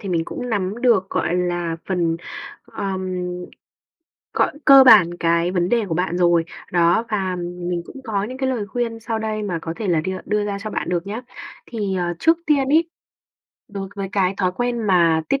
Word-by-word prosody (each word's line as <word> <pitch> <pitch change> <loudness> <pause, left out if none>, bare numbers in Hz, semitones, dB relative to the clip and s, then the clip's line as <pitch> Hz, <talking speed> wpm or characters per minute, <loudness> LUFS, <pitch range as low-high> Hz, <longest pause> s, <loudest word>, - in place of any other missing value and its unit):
thì 200 - -6
mình 170 -2 +1
cũng 245 - -6
nắm 205 +2 -2
được, 225 -7 +4
gọi 175 - 0
là, 175 -2 -1
phần, 170 -3 0 0.5
ờm 190 -1 -4 1.2
gọi, - - +2
cơ 275 -1 +9
bản 210 -9 +8
cái 170 +1 +2
vấn 180 -1 0
đề 235 -1 +2
của 165 - -2
bạn 180 +1 -1
rồi. 175 -2 +3 0.3
Đó, 175 +6 +3
và 190 -4 -1 0.3
mình 175 -1 -2
cũng - - -12
có 205 -3 -1
những 255 +4 -7
cái 265 -1 0
lời 230 -6 -2
khuyên 230 +1 -3
sau 225 0 -3
đây 215 -1 -3
mà 180 -5 -2
có 165 - -4
thể 215 - -4
là 165 -3 +3
đưa 185 +4 -3
đưa 210 0 0
ra 200 -1 -3
cho 215 +2 -6
bạn - - -3
được 175 +1 -1
nhá. 215 +4 -4 0.5
Thì, 205 -5 -2
à, 175 -1 -1
trước 325 +1 +3
tiên 280 -3 +2
ấy, 325 +3 +3 0.8
đối 195 -2 -6
với 195 -1 -3
cái 195 -1 +1
thói 185 -2 0
quen 245 +3 -1
mà 170 -4 +4
tiết 275 0 +1
195 Hz, 205 wpm, -21 LUFS, 175-225 Hz, 1.2 s, cơ